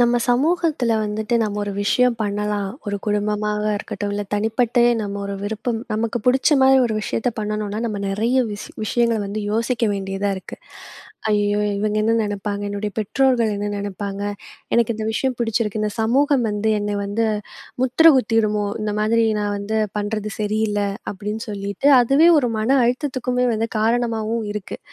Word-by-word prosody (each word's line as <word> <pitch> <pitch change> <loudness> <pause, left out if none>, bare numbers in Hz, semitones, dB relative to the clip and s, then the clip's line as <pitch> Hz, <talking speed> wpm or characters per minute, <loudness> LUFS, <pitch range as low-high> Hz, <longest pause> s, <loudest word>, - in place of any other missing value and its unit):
நம்ம 240 0 +4
சமூகத்துல 295 -1 +2
வந்துட்டு, 215 +2 -2
நம்ம 210 -1 -2
ஒரு 205 - -4
விஷயம் 250 +3 +2
பண்ணலாம். 205 -1 -1 0.2
ஒரு 205 - -1
குடும்பமாக 210 0 0
இருக்கட்டும். 205 0 -4
இல்ல, 205 - -2
தனிப்பட்ட 225 +3 +1 0.2
நம்ம 200 -1 -4
ஒரு 200 - -4
விருப்பம். 220 +3 -2
நமக்கு 225 +2 -1
புடிச்ச 265 +4 +4
மாரி 265 0 +6
ஒரு 220 - -2
விஷயத்த 235 +4 -1
பண்ணணும்னா, 210 -1 -2
நம்ம 210 -3 -3
நிறைய 225 +6 0 0.2
விஷ 205 - -7 0.2
விஷயங்கள 235 0 +1
வந்து 205 +2 -4
யோசிக்க 230 +3 -1
வேண்டியதா 195 0 -2
இருக்கு. 190 - -9 0.7
"ஐயயோ! 205 0 +2 0.2
இவங்க 210 0 0
என்ன 225 +1 +2
நினைப்பாங்க? 205 0 -3
என்னுடைய 205 +1 -3
பெற்றோர்கள் 235 +1 +2
என்ன 205 +1 -2
நினைப்பாங்க? 200 0 -5 0.5
எனக்கு 235 -1 +2
இந்த 220 0 -3
விஷயம் 255 +2 -1
புடிச்சிருக்கு. 225 -2 0
இந்த 210 - -1
சமூகம் 265 +3 +2
வந்து, 210 +1 0
என்ன 205 0 -2
வந்து 210 +3 0 0.6
முத்திரை 260 +6 +6
குத்திருமோ! 215 -3 +1 0.2
இந்த 210 -1 -2
மாதிரி 225 +2 +3 0.2
நான் 205 0 -1
வந்து 215 +2 -2 0.2
பண்றது 210 0 -3
சரியில்ல" 210 0 0 0.3
அப்படின்னு 210 +2 -5
சொல்லிட்டு, 200 +5 -1
அதுவே 275 +7 +5
ஒரு 245 -3 0
மன 235 +6 +2
அழுத்தத்துக்குமே 250 -1 0
வந்து 225 +1 -1
காரணமாவும் 225 0 0
இருக்கு. 210 -2 -6
215 Hz, 150 wpm, -21 LUFS, 205-240 Hz, 0.7 s, மாரி